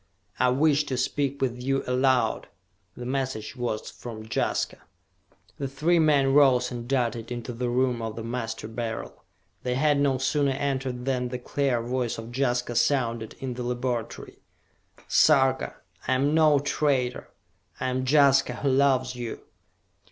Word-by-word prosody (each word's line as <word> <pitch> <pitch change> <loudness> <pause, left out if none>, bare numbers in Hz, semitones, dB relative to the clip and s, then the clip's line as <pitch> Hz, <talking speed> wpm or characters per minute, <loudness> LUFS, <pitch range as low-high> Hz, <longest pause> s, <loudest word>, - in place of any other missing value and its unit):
"I 125 - +4
wish 145 +3 +3
to 130 -3 -3
speak 140 +2 -1
with 125 -1 -2
you 135 +1 0
aloud!" 130 0 +1 0.5
The 125 - -6
message 130 -4 -3
was 120 -3 -3
from 110 -2 -9
Jaska! 110 - -1 0.8
The 140 - -2
three 155 +6 +1
men 145 -4 +3
rose 130 -3 +4
and 120 -1 -6
darted 120 -3 -1
into 120 0 -5
the 120 +1 -2
room 125 -1 +1
of 110 -1 -4
the 115 - -6
Master 115 -2 -4
Beryl. 115 0 -5 0.4
They 125 0 -1
had 145 +1 +2
no 140 -2 +2
sooner 140 +1 +1
entered 130 -2 -2
than 130 -2 0
the 125 +1 -4
clear 125 -1 -1
voice 125 -1 -2
of 115 +2 -8
Jaska 125 -2 0
sounded 120 -3 0
in 130 -2 -4
the 125 - -6
laboratory. 120 -1 -4 0.7
"Sarka, 135 -3 +3 0.3
I - - +2
am 140 +3 +2
no 155 -2 +5
traitor! 140 -3 0 0.5
I 130 - -1
am 130 0 -1
Jaska, 135 -1 +4
who 140 - -1
loves 130 -1 +2
you! 120 -2 -6
130 Hz, 150 wpm, -26 LUFS, 120-135 Hz, 0.8 s, no